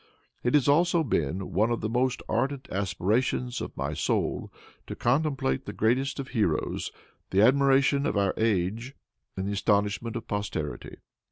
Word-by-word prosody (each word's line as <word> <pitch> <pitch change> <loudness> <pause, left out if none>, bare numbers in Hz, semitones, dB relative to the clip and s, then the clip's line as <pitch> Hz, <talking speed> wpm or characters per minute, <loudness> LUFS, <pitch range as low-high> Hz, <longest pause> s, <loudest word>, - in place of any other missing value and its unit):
It 120 +3 +1
has 145 -4 +3
also 170 +3 +4
been 90 - -1
one 105 +6 +3
of 120 - -1
the 110 - -1
most 125 +2 0
ardent 130 +4 -1
aspirations 105 +6 0
of - - -7
my - - -2
soul - - -1 0.4
to - - -5
contemplate 130 - 0
the - - -4
greatest 130 +6 +1
of 135 0 -5
heroes, 105 - -1 0.4
the 95 - +3
admiration 140 +2 +4
of - - -1
our 100 -1 +2
age 110 +4 -1 0.4
and 95 +1 -2
the - - -1
astonishment 105 +3 0
of 115 - -5
posterity." 100 -11 -4
115 Hz, 155 wpm, -27 LUFS, 100-135 Hz, 0.4 s, also